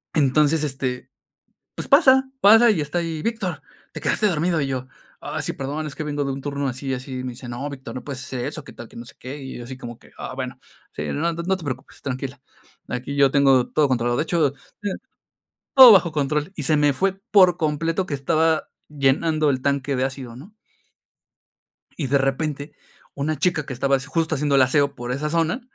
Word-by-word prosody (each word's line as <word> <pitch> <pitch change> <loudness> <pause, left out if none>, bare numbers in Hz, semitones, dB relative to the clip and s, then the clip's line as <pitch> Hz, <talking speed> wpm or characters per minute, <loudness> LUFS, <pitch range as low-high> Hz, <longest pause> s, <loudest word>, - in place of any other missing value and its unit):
Entonces, 150 +1 +3
este 130 -3 -3 0.7
pues, - - -5
pasa 265 -3 +5
pasa 225 +4 +7
y 195 -8 +2
está 150 +4 -3
ahí: 165 -2 -3
"Víctor, 195 -10 -2 0.3
te 155 - -7
quedaste 160 +8 +1
dormido". 170 -1 +1
Y 140 - -1
yo: 130 -1 -3 0.3
"Ah, - - -4
sí, - - -3
perdón, 145 +3 -4
es 145 - -8
que 155 - -4
vengo 145 -1 -2
de 135 - -2
un 135 - -6
turno 140 0 -3
así 130 +2 -5
y - - 0
así". 130 0 -5
Y - - -5
me 130 - -4
dice: 120 +1 -10
"No, 120 +4 -5
Víctor, 135 -2 -8
no 130 - -6
puedes 135 -2 -5
hacer 125 -2 -4
eso, 150 +2 -5
qué - - -12
tal 120 - -10
que - - -14
no 120 - -8
sé - - -14
qué". 130 +4 -8
Y 135 -2 -8
yo 120 - -7
así 130 +2 -8
como 120 -2 -8
que: - - -21
"Ah, - - -6
bueno. 130 -1 -5 0.3
Sí, - - -5
no 165 +4 0
no 170 +3 -1
te 180 - -11
preocupes, 130 -2 -7
tranquila. 135 0 -5 0.5
Aquí 125 +3 -4
yo 140 -1 +4
tengo 135 -3 +4
todo 150 -2 +2
controlado. 120 -2 0
De - - +1
hecho 160 -5 +1 1.2
todo 260 -3 +11
bajo 175 -4 +4
control". 150 +3 -1
Y 150 - -3
se 155 +2 +3
me 145 -1 +3
fue, 190 +7 0 0.2
por 185 -4 +6
completo, 165 +2 -1
que - - -8
estaba 160 +3 +1 0.2
llenando 150 +2 +1
el 130 -2 -1
tanque 140 0 0
de 130 - +1
ácido, 130 -3 -5
¿no? 175 - -13 1.4
Y, 145 - -2
de 140 +2 +3
repente, 145 +2 -2 0.4
una 150 +2 -2
chica 160 -5 +1
que 135 - -6
estaba 135 +2 +1
s 130 - -8
justo 165 -1 0
haciendo 145 0 +1
el 135 - +6
aseo 140 +2 +2
por 120 -1 -5
esa 145 +4 -2
zona, 165 - 0
145 Hz, 215 wpm, -22 LUFS, 130-160 Hz, 1.4 s, todo